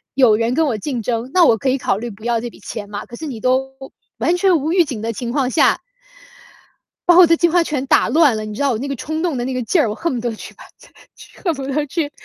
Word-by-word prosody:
有 250 Hz, -6 st, +5 dB
人 230 Hz, +2 st, 0 dB
跟 320 Hz, -, +2 dB
我 225 Hz, -5 st, -1 dB
竞 245 Hz, +1 st, -4 dB
争， 235 Hz, +3 st, -3 dB
那 365 Hz, -2 st, +5 dB
我 225 Hz, -, +4 dB
可 260 Hz, -, -1 dB
以 265 Hz, -, +1 dB
考 195 Hz, -, 0 dB
虑 240 Hz, +2 st, -5 dB
不 200 Hz, +2 st, -15 dB
要 235 Hz, -1 st, +1 dB
这 240 Hz, -, -5 dB
笔 -, -, -17 dB
钱 205 Hz, -2 st, -7 dB
吗？ 205 Hz, 0 st, -5 dB
可 240 Hz, -, -10 dB
是 320 Hz, -, -7 dB
你 240 Hz, -5 st, -6 dB
都 265 Hz, +1 st, 0 dB, 0.5 s
完 350 Hz, +1 st, +1 dB
全 355 Hz, -5 st, +3 dB
无 315 Hz, +3 st, -1 dB
预 350 Hz, -3 st, +4 dB
警 245 Hz, -8 st, -6 dB
的 230 Hz, +1 st, -2 dB
情 235 Hz, +2 st, -5 dB
况 260 Hz, -2 st, 0 dB
下， 315 Hz, -, +2 dB, 1.2 s
把 350 Hz, -, +5 dB
我 360 Hz, -2 st, +9 dB
的 330 Hz, 0 st, +4 dB
计 345 Hz, -, +3 dB
划 345 Hz, 0 st, +3 dB
全 280 Hz, -4 st, -3 dB
打 -, -, +3 dB
乱 305 Hz, -7 st, +4 dB
了， 215 Hz, -, -4 dB
你 215 Hz, -, -7 dB
知 -, -, -5 dB
道 275 Hz, -, +2 dB
我 220 Hz, -, -2 dB
那 280 Hz, -, -4 dB
个 275 Hz, -, -3 dB
冲 315 Hz, +6 st, -4 dB
动 320 Hz, -7 st, -1 dB
的 240 Hz, -, -2 dB
那 260 Hz, -, -3 dB
个 255 Hz, -, -2 dB
劲 335 Hz, +9 st, +1 dB
儿， 235 Hz, -, +1 dB
我 -, -, -2 dB
恨 335 Hz, -3 st, -2 dB
不 235 Hz, -, -3 dB
得 235 Hz, -2 st, -3 dB
去 -, -, -10 dB
把 -, -, -14 dB, 0.2 s
他 -, -, -17 dB, 0.3 s
去 -, -, -16 dB
恨 340 Hz, -4 st, +1 dB
不 275 Hz, -, -7 dB
得 295 Hz, +2 st, -1 dB
去 295 Hz, -1 st, -2 dB
265 Hz, 320 characters per minute, -19 LUFS, 230-315 Hz, 1.2 s, 我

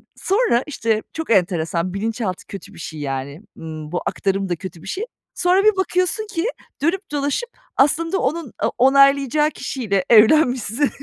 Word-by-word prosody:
sonra 390 Hz, -, +1 dB
işte 225 Hz, -6 st, -1 dB
çok 320 Hz, 0 st, -5 dB
enteresan, 175 Hz, -2 st, +1 dB
bilinçaltı 210 Hz, -2 st, -3 dB
kötü 200 Hz, +1 st, -9 dB
bir 175 Hz, -, -13 dB
şey 155 Hz, -1 st, -7 dB
yani, 140 Hz, +2 st, -4 dB, 0.2 s
ımm, 155 Hz, -1 st, -8 dB
bu 175 Hz, -, -2 dB
aktarım 195 Hz, -1 st, -1 dB
da 175 Hz, -, 0 dB
kötü 170 Hz, -1 st, -9 dB
bir 190 Hz, -, -12 dB
şey. 400 Hz, -, -3 dB, 0.3 s
Sonra 365 Hz, +2 st, +3 dB
bir 430 Hz, -1 st, +5 dB
bakıyorsun 375 Hz, +3 st, 0 dB
ki 380 Hz, -3 st, -2 dB, 0.4 s
dönüp 365 Hz, +5 st, -1 dB
dolaşıp 290 Hz, -, -1 dB, 0.3 s
aslında 330 Hz, +6 st, +2 dB
onun, 300 Hz, -1 st, -2 dB
aaa, -, -, +1 dB
onaylayacağı 275 Hz, +2 st, +4 dB
kişiyle 200 Hz, -12 st, -2 dB
evlenmişsin. 245 Hz, +2 st, +4 dB
245 Hz, 150 wpm, -21 LUFS, -, 0.4 s, bir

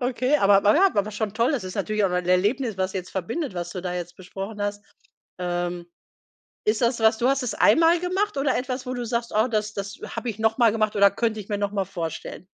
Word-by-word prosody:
Okay, 255 Hz, +3 st, +1 dB
aber, 195 Hz, -5 st, +5 dB
naja 295 Hz, -, +5 dB
aber 205 Hz, +1 st, 0 dB
schon 210 Hz, -1 st, -3 dB
toll. 235 Hz, +6 st, +2 dB
Es 240 Hz, -9 st, -3 dB
ist 185 Hz, -, -6 dB
natürlich 210 Hz, +1 st, 0 dB
auch 190 Hz, -, +2 dB
ein 180 Hz, 0 st, -1 dB
Erlebnis, 205 Hz, +6 st, +1 dB
was 190 Hz, 0 st, -1 dB
jetzt 185 Hz, -1 st, -5 dB
verbindet, 195 Hz, -, -3 dB
was 175 Hz, -1 st, -4 dB
du 185 Hz, -, -5 dB
da 180 Hz, 0 st, -4 dB
jetzt 175 Hz, 0 st, -6 dB
besprochen 195 Hz, +3 st, -7 dB
hast. 205 Hz, 0 st, -3 dB, 0.6 s
Ähm, 175 Hz, -1 st, -3 dB, 0.8 s
ist 215 Hz, +2 st, +2 dB
das 235 Hz, 0 st, +1 dB
was 220 Hz, 0 st, +4 dB
du 240 Hz, -, +2 dB
hast 275 Hz, -1 st, +1 dB
es 235 Hz, -4 st, -2 dB
einmal 330 Hz, +8 st, +5 dB
gemacht 370 Hz, +1 st, -1 dB
oder 275 Hz, -1 st, +1 dB
etwas, 255 Hz, 0 st, -3 dB
wo 255 Hz, -, -3 dB
du 245 Hz, -1 st, -4 dB
sagst: 235 Hz, 0 st, -2 dB
Oh, 220 Hz, +3 st, +3 dB
das 215 Hz, -3 st, -1 dB
das 200 Hz, +2 st, -6 dB, 0.2 s
habe 245 Hz, -, -3 dB
ich 220 Hz, -1 st, -6 dB
noch 220 Hz, 0 st, +1 dB
mal 235 Hz, -3 st, +5 dB
gemacht 215 Hz, -1 st, 0 dB
oder 200 Hz, -1 st, +6 dB
könnte 220 Hz, 0 st, -1 dB
ich 205 Hz, -, -9 dB
mir 205 Hz, -, -1 dB
noch 200 Hz, 0 st, -1 dB
mal 200 Hz, -2 st, -1 dB
vorstellen? 170 Hz, 0 st, -6 dB
215 Hz, 240 wpm, -24 LUFS, 190-245 Hz, 0.8 s, oder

